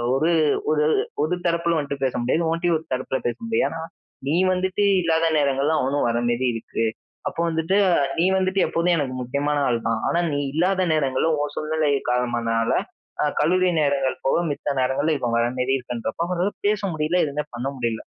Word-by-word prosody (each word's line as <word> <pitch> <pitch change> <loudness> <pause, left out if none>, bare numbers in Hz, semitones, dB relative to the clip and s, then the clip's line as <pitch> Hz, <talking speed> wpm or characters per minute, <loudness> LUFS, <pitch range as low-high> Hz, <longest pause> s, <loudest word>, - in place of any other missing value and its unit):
ஒரு 160 +5 +2 0.4
ஒரு 150 -1 +2 0.4
ஒரு 175 +3 0
தரப்பில 170 0 +1
வந்துட்டு 140 -1 -4
பேச 130 - 0
முடியாது. 160 +7 +1
உன்ட்டேயும் 170 0 +1
ஒரு 160 - -17
தரப்பில 130 +1 -2
பேச 120 - -1
முடியாது. 225 - +1
ஏன்னா 165 0 -6 0.5
நீ 150 - +1 0.2
வந்துட்டு 190 +2 0 0.2
இல்லாத 165 -1 +2
நேரங்கள்ல 140 +2 +1
அவனும் 135 -1 0
வர 115 - 0
மாரி 120 +2 0
இருக்கு. 115 0 -3 0.4
அப்போ - - -5
வந்துட்டு 160 +4 0 0.4
நீ 170 - +3
வந்துட்டு 190 +1 0
எப்போமே 170 +2 +1
எனக்கு 140 -4 -2
முக்கியமான 140 +4 -1
ஆள் 120 -2 +1
தான். 115 -1 0
ஆனா 170 - +1
நீ 145 - 0
இல்லாத 185 +4 +1
நேரங்கள்ல 140 +1 +1
உன் 145 0 -3
சூழ்நிலை 155 -1 0 0.2
காலமானதனால 120 -2 0 0.5
அ - - +2
கல்லூரி 185 +4 +3
நேரங்கள் 140 -2 +1
போக 135 - +3
மித்த 145 0 -3
நேரங்கள்ல 135 +5 +1
இவன் 120 -3 -2
வர 115 - +2
மாரி 125 +1 0
இருக்குன்றப்போ, 120 +4 -4
அவ 185 +3 +1 0.2
பேச 210 0 +2
முடியல 155 +3 0
எதுவுமே 150 0 -3
பண்ண 120 +2 -3
முடியல. 115 -3 -2
145 Hz, 175 wpm, -23 LUFS, 130-165 Hz, 0.5 s, நீ